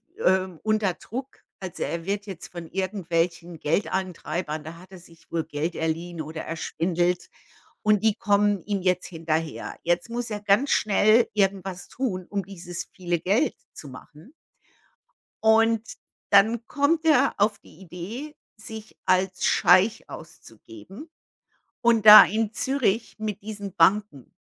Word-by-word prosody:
w 455 Hz, -, -12 dB
ähm, 185 Hz, -3 st, +1 dB
unter 215 Hz, -4 st, +1 dB
Druck. 260 Hz, +9 st, -8 dB, 0.2 s
Also, 185 Hz, -3 st, -5 dB
er 165 Hz, 0 st, -4 dB
wird 200 Hz, +1 st, -2 dB
jetzt 185 Hz, -4 st, -8 dB
von 170 Hz, -2 st, -8 dB
irgendwelchen 175 Hz, -3 st, -2 dB
Geldeintreibern 165 Hz, -2 st, -2 dB
da 165 Hz, +1 st, -9 dB
hat 185 Hz, +2 st, -16 dB
er 185 Hz, -, -11 dB
sich 165 Hz, -1 st, -20 dB
wohl 165 Hz, -2 st, -1 dB
Geld 160 Hz, +2 st, -3 dB
geliehen 165 Hz, +1 st, -3 dB
oder 155 Hz, +1 st, -6 dB
erschwindelt, 175 Hz, +2 st, -2 dB, 0.5 s
und 215 Hz, -1 st, +2 dB
die 220 Hz, -2 st, +3 dB
kommen 205 Hz, -1 st, +1 dB
ihm 200 Hz, -2 st, -2 dB
jetzt 180 Hz, -1 st, 0 dB
hinterher. 160 Hz, -2 st, -3 dB
Jetzt 175 Hz, +5 st, 0 dB
muss 240 Hz, 0 st, -4 dB
er 210 Hz, -1 st, -5 dB
ganz 205 Hz, +7 st, +2 dB
schnell 215 Hz, +3 st, +4 dB
irgendwas 195 Hz, -2 st, -1 dB
tun, 190 Hz, -9 st, -3 dB
um 200 Hz, -2 st, -2 dB
dieses 175 Hz, -3 st, -7 dB
viele 175 Hz, -2 st, -2 dB
Geld 200 Hz, +7 st, +1 dB, 0.2 s
zu 145 Hz, -, -10 dB
machen. 150 Hz, -, -14 dB, 1.1 s
Und 225 Hz, 0 st, +3 dB, 0.4 s
dann 220 Hz, +4 st, +4 dB
kommt 310 Hz, +3 st, +1 dB
er 280 Hz, -4 st, +4 dB
auf 205 Hz, +1 st, +2 dB
die 170 Hz, -, -19 dB
Idee, 200 Hz, -, -8 dB, 0.2 s
sich 220 Hz, 0 st, -10 dB
als 185 Hz, 0 st, +1 dB
Scheich 185 Hz, +3 st, +3 dB
auszugeben. 160 Hz, -, -12 dB, 0.7 s
Und 230 Hz, -2 st, +3 dB
da 210 Hz, 0 st, +12 dB
in 220 Hz, +2 st, -1 dB
Zürich 235 Hz, -5 st, -1 dB
mit 210 Hz, -2 st, -4 dB
diesen 205 Hz, -2 st, -7 dB
Banken. 180 Hz, -, +1 dB
190 Hz, 140 wpm, -25 LUFS, 170-215 Hz, 1.1 s, da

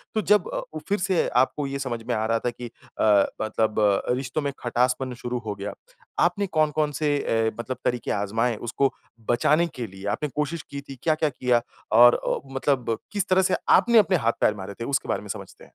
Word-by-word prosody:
तो 215 Hz, -, +2 dB
जब 210 Hz, -2 st, +3 dB
अ, -, -, -1 dB
उ, 155 Hz, -, -4 dB
फिर 205 Hz, 0 st, +1 dB
से 185 Hz, -2 st, +1 dB
आपको 140 Hz, +2 st, -1 dB
ये 140 Hz, 0 st, -4 dB
समझ 125 Hz, -4 st, -3 dB
में 125 Hz, -, 0 dB
आ 110 Hz, -, 0 dB
रहा 115 Hz, 0 st, +1 dB
था 120 Hz, -, +3 dB
कि 120 Hz, +1 st, -8 dB
अ, 105 Hz, -3 st, +1 dB, 0.2 s
मतलब 110 Hz, 0 st, 0 dB, 0.4 s
रिश्तों 130 Hz, +4 st, -2 dB
में 140 Hz, -1 st, -1 dB
खटासपन 125 Hz, +1 st, 0 dB
शुरू 125 Hz, 0 st, -2 dB
हो 105 Hz, -2 st, -3 dB
गया, 100 Hz, +1 st, -5 dB, 0.5 s
आपने 185 Hz, +4 st, +2 dB
कौन-कौन 155 Hz, -2 st, +1 dB
से 150 Hz, -2 st, +2 dB
अ, 115 Hz, 0 st, +1 dB
मतलब 125 Hz, +1 st, -4 dB
तरीके 125 Hz, -1 st, -1 dB
आज़माए 110 Hz, +4 st, 0 dB
उसको 125 Hz, +5 st, 0 dB, 0.4 s
बचाने 150 Hz, +8 st, +3 dB
के 120 Hz, -3 st, -4 dB
लिए, 95 Hz, +1 st, -11 dB
आपने 125 Hz, +9 st, -1 dB
कोशिश 150 Hz, +2 st, -2 dB
की 140 Hz, 0 st, -5 dB
थी, 135 Hz, -1 st, -10 dB
क्या-क्या 155 Hz, -1 st, +2 dB
किया? 125 Hz, -3 st, +1 dB, 0.4 s
और 120 Hz, 0 st, +8 dB
अ, -, -, -1 dB, 0.2 s
मतलब 130 Hz, -5 st, 0 dB
किस 205 Hz, -1 st, -1 dB
तरह 185 Hz, 0 st, +5 dB
से 185 Hz, 0 st, +2 dB, 0.2 s
आपने 235 Hz, -1 st, +3 dB
अपने 190 Hz, -2 st, +3 dB
हाथ-पैर 115 Hz, -, +2 dB
मारे 100 Hz, 0 st, -7 dB
थे? 115 Hz, -, -3 dB
उसके 140 Hz, +1 st, -1 dB
बारे -, -, 0 dB
में -, -, -11 dB
समझते -, -, -6 dB
हैं। -, -, -27 dB
130 Hz, 210 wpm, -25 LUFS, 115-155 Hz, 0.5 s, और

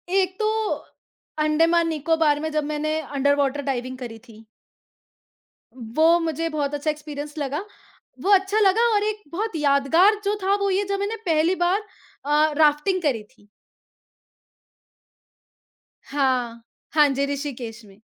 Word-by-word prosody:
एक 375 Hz, -1 st, +1 dB
तो 430 Hz, -, 0 dB, 1.0 s
अंडमान 330 Hz, +2 st, +3 dB
निकोबार 315 Hz, -1 st, +1 dB
में 315 Hz, +1 st, -3 dB
जब 305 Hz, -1 st, 0 dB
मैंने 305 Hz, +1 st, -2 dB
अंडरवॉटर 285 Hz, 0 st, 0 dB
डाइविंग 255 Hz, -2 st, -3 dB
करी 235 Hz, -3 st, -7 dB
थी। 225 Hz, 0 st, -15 dB, 1.3 s
वो 240 Hz, +5 st, -2 dB, 0.2 s
मुझे 330 Hz, 0 st, -2 dB
बहुत 295 Hz, -2 st, -2 dB
अच्छा 290 Hz, +1 st, -2 dB
एक्सपीरियंस 295 Hz, 0 st, -8 dB
लगा, 295 Hz, +4 st, -3 dB, 0.6 s
वो 400 Hz, -, 0 dB
अच्छा 390 Hz, +2 st, +3 dB
लगा 435 Hz, +3 st, +4 dB
और 410 Hz, -, +2 dB
एक 425 Hz, 0 st, -3 dB
बहुत 415 Hz, +3 st, -3 dB
यादगार 300 Hz, +7 st, +4 dB
जो 410 Hz, +1 st, +1 dB
था 390 Hz, +1 st, +3 dB
वो 400 Hz, -, +1 dB
ये 385 Hz, +2 st, +1 dB
जब 395 Hz, -, -1 dB
मैंने 405 Hz, +3 st, -2 dB
पहली 330 Hz, +1 st, +2 dB
बार 380 Hz, +4 st, +1 dB, 0.4 s
अ, 300 Hz, +1 st, +3 dB
राफ्टिंग 315 Hz, +5 st, +3 dB
करी 265 Hz, -9 st, 0 dB
थी। 205 Hz, 0 st, -26 dB, 2.6 s
हाँ, 250 Hz, -4 st, -1 dB, 0.3 s
हाँ 300 Hz, -1 st, +6 dB
जी, 275 Hz, +1 st, 0 dB
ऋषिकेश 245 Hz, -5 st, -6 dB
में। 195 Hz, -1 st, -18 dB
300 Hz, 135 wpm, -23 LUFS, 275-345 Hz, 2.6 s, हाँ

